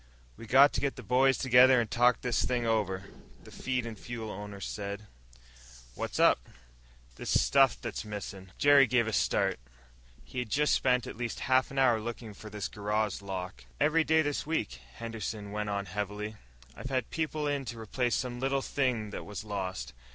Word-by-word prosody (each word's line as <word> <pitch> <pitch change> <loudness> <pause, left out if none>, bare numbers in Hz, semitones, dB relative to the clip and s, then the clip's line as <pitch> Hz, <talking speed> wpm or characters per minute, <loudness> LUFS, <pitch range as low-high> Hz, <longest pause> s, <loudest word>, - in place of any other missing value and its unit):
"We 115 - -11
got 135 +5 +6
to 115 - -1
get 140 0 -1
the - - -9
boys 130 +2 +3
together 130 0 +6
and 115 -3 -2
talk 120 0 +3
this 125 -3 0
thing 125 -2 0
over," 100 -4 0 0.4
the - - -14
feed 125 -2 -2
and 115 -1 -6
fuel 115 0 -6
owner 105 0 -7
said. 100 +1 -5 0.9
"What's - - -4
up?" - - +4 0.7
"This - - +1
stuff 135 -2 +4
that's - - -5
missin'." 100 -3 -7
Jerry 145 -2 +6
gave 120 -1 +3
a 110 - -3
start. - - +1 0.7
He 130 - -5
had 125 -3 -3
just 150 +6 +2
spent 125 -2 +2
at - - -8
least 120 -1 -4
half 130 0 +2
an 135 - -9
hour 120 -4 +4
looking 115 -1 -6
for 110 +2 -10
this 105 -1 -4
garage 105 0 -2
lock. 95 -1 -6
"Every 155 +2 +3
day 160 0 +4
of - - -2
this 145 -1 -1
week," 145 - -2 0.2
Henderson 110 -3 -5
went 105 0 -3
on 100 -1 -2
heavily, 105 +3 -4 0.4
"I've 130 - -7
had 130 -4 -1
people 155 -1 -2
in 145 -1 -1
to 120 -2 -6
replace 120 +3 -1
some 125 -1 -3
little 135 +1 0
thing 120 -6 -1
that - - -6
was 105 +1 -7
lost. 95 - -4
115 Hz, 190 wpm, -30 LUFS, 105-130 Hz, 0.9 s, got